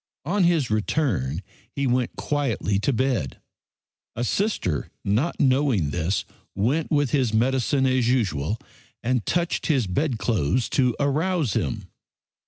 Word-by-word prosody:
On 185 +3 +2
his 160 -9 +2
return 100 - 0 0.3
he 140 +2 -2
went 125 -1 0
quietly 120 -9 -1
to 105 - +1
bed. 125 - -1 0.8
A 120 - -2
sister, 125 - -1
not 115 +12 0
knowing 130 - +2
this, 85 +5 -1 0.3
went 130 +11 0
with 145 -4 +1
his 125 -6 +1
medicine 130 +3 +2
as 130 -2 +2
usual 100 - 0 0.5
and 125 -1 +1
touched 175 -1 0
his 135 -7 +2
bedclothes 115 - 0
to 125 -3 +2
arouse 150 - +1
him. - - -2
125 Hz, 125 wpm, -24 LUFS, 105-145 Hz, 0.8 s, On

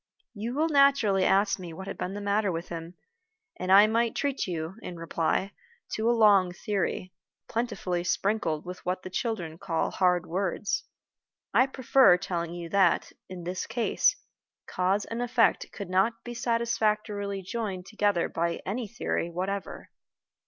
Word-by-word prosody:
You 230 +3 -4
will 310 +3 +2
naturally 275 -10 +4
ask 200 +1 +3
me 175 -3 -7
what 190 +3 -8
had - - -5
been 190 +2 -4
the 205 - -5
matter 205 0 +1
with 165 0 -5
him, 170 +1 -7 0.6
and 185 +1 -2
I 200 +2 +9
might 230 +1 +1
treat 280 -5 -1
you, 165 -1 -3
in 180 - -7
reply, 165 +3 -1 0.4
to 220 +2 +1
a - - +5
long 205 -6 +5
theory, 185 0 -2 0.3
plentifully 205 -7 -2
sprinkled 180 -4 0
with 180 0 -8
what 185 +1 -2
the 185 - -7
children 175 -7 -3
call 165 -3 -1
hard 180 -1 +2
words. 195 +3 -2 0.7
I 255 - +5
prefer 260 -6 +5
telling 175 -2 -3
you 170 -1 -6
that, 190 -3 +3 0.2
in 180 -2 -7
this 180 +2 -4
case, 230 +1 +2 0.5
cause 190 +3 0
and 230 +1 -4
effect 245 -1 +2
could 200 -3 -7
not 220 +5 +1
be 240 - -6
satisfactorily 215 -4 -1
joined 190 -3 -4
together 205 -4 +1
by 170 +1 -1
any 220 +4 -3
theory 200 -5 -2
whatever. 190 +3 -4
195 Hz, 155 wpm, -28 LUFS, 180-225 Hz, 0.7 s, I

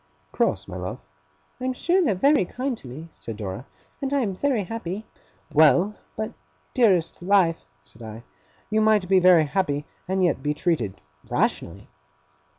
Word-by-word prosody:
'Cross, - - 0
my - - -6
love?' - - -5 0.6
'I 255 - -4
am 260 - 0
sure 350 +8 +2
they're 225 - +2
very 280 +6 +4
kind 255 +8 -3
to 140 - -13
me,' 155 +7 -9
said 115 -2 -8
Dora, 105 +4 -6 0.3
'and 275 -1 -2
I 280 -1 +2
am 205 -5 -1
very 245 +1 0
happy 215 0 -5 0.2
' - - -27
'Well! 160 +6 +5 0.2
But 215 0 -2
my - - -19 0.4
dearest 195 - +2
life!' 180 -3 +2 0.2
said 110 +10 -19
I, 110 +1 -8 0.5
'you 215 0 +3
might 215 -3 +3
be 190 0 +5
very 180 -3 +6
happy, 145 -3 -1 0.2
and 190 0 +1
yet 175 - +2
be 150 0 -1
treated 125 - -1 0.3
rationally. - - -1
185 Hz, 170 wpm, -24 LUFS, 150-220 Hz, 0.6 s, very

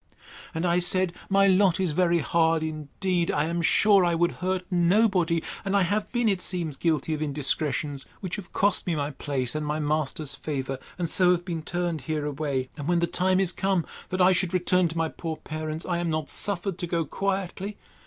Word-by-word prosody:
—And 165 +2 -1
I 175 0 +3
said, 180 0 +2 0.2
My 195 0 +4
lot 190 -2 +4
is 185 -4 +1
very 175 +1 +2
hard 165 +1 +2
indeed; 165 +3 -2
I 145 - +1
am 170 +2 -1
sure 200 +3 +5
I 170 -1 +2
would 170 +1 +2
hurt 185 0 -1
nobody; 180 -2 +3 0.2
and 195 +1 +1
I 195 - +4
have 205 +4 -1
been, 240 -2 +1
it 195 -3 +1
seems, 170 -7 -2
guilty 160 0 0
of 155 - -3
indiscretions, 145 -1 -1
which 185 +1 -4
have 195 -4 -9
cost 200 -2 +1
me 170 - +1
my 145 0 -2
place, 130 -3 -3
and 155 0 -2
my 150 +1 -2
master's 150 -1 -2
favour, 135 -3 -4 0.2
and 175 -2 -1
so 180 +2 +4
have 175 0 -3
been 170 -3 -3
turned 170 -2 -2
away: 145 -3 -2
and 145 -1 -5
when 175 0 +2
the 170 - +2
time 185 +2 +1
is 190 -2 +2
come, 190 -4 0 0.2
that 185 0 -1
I 180 +1 +6
should 185 0 +1
return 180 0 +2
to 165 +1 -6
my 165 0 +1
poor 160 0 -5
parents, 155 +1 -5
I 175 -2 -1
am 175 -1 -1
not 155 -1 -2
suffered 195 -2 -1
to 175 - -2
go 170 -1 0
quietly. 195 +3 -3
170 Hz, 205 wpm, -26 LUFS, 155-185 Hz, 0.2 s, I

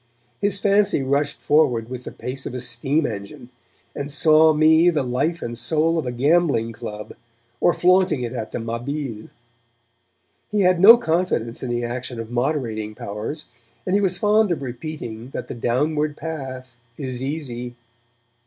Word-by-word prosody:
His 200 -1 +3
fancy 200 -7 +2
rushed 140 +2 0
forward 125 -7 +2
with 125 0 -7
the - - -6
pace 130 +1 -5
of - - -6
a - - -3
steam 130 +6 -1
engine, 100 +1 -7 0.5
and 140 0 -4
saw 155 +1 +5
me 160 +2 +5
the 155 -5 0
life 135 +7 -1
and 120 0 -4
soul 160 +6 +1
of 150 - -4
a - - -1
gambling 140 -3 +2
club, 105 -2 -8 0.5
or - - +4
flaunting 180 -6 +3
it 120 0 -4
at 110 -3 -4
the - - -4
Mabille. 115 0 -4 1.2
He 210 -1 +1
had 180 -2 +3
no 225 +6 +10
confidence 165 - -1
in 130 - -4
the 120 0 -1
action 120 0 -4
of 115 0 -7
moderating 120 -5 -2
powers, 110 +12 -6 0.4
and 185 - -1
he 205 - +3
was 185 -2 +1
fond 210 -1 +3
of 155 -5 -2
repeating 120 -3 -7
that - - -5
the - - -6
downward 150 +6 -1
path 130 -5 -7 0.2
is 130 -3 -4
easy. 125 -4 -5
135 Hz, 165 wpm, -22 LUFS, 120-160 Hz, 1.2 s, no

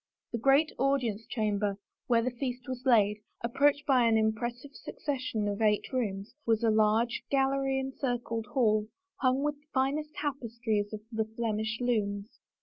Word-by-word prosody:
The 230 - -2
great 275 +6 +4
audience 245 -6 0
chamber, 210 -4 0 0.3
where 235 -2 +3
the 255 - 0
feast 250 0 -4
was 255 0 -5
laid, 210 -4 +4 0.3
ap 235 - -4
proached 290 +1 +3
by 260 -5 +4
an 225 -1 +4
impressive 240 +5 -1
succession 255 -7 -3
of 205 +1 -2
eight 210 +3 +2
rooms, 205 -5 -2
was 225 -1 +1
a 225 - +4
large 220 +2 +2
gallery 270 0 +2
encircled 245 -4 -3
hall, 215 -5 +2 0.3
hung 260 +1 +2
with 295 0 -2
finest 290 +4 0
tapestries 235 -7 -2
of 215 -1 -6
the 220 -1 0
Flemish 220 -1 -1
looms. 210 -3 -1
235 Hz, 150 wpm, -30 LUFS, 215-270 Hz, 0.3 s, great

